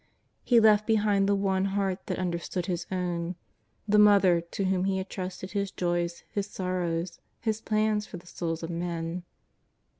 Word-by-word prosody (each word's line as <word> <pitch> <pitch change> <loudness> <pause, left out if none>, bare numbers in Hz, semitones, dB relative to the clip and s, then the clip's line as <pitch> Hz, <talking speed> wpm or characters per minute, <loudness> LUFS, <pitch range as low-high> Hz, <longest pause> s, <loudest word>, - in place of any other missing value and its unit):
He 240 -2 +5
left 215 -1 +5
behind 205 -3 +3
the 200 - +4
one 195 -1 +1
heart 195 -2 -1
that - - -2
understood 175 0 -2
His 175 -2 -3
own, 180 -1 -2 0.5
the 210 0 +4
Mother 200 -4 +6
to 170 +4 -4
whom 185 0 +1
He 195 -1 +1
had 190 0 -5
trusted 185 0 -5
His 200 -1 -1
joys, 175 -1 -2
His 200 0 -2
sorrows. 180 -3 -2 0.2
His 220 -1 -1
plans 215 -1 +1
for 180 - -8
the 175 - -14
Bouls 165 -1 -2
of 165 - -4
men. 170 0 -3
185 Hz, 170 wpm, -28 LUFS, 175-205 Hz, 0.5 s, Mother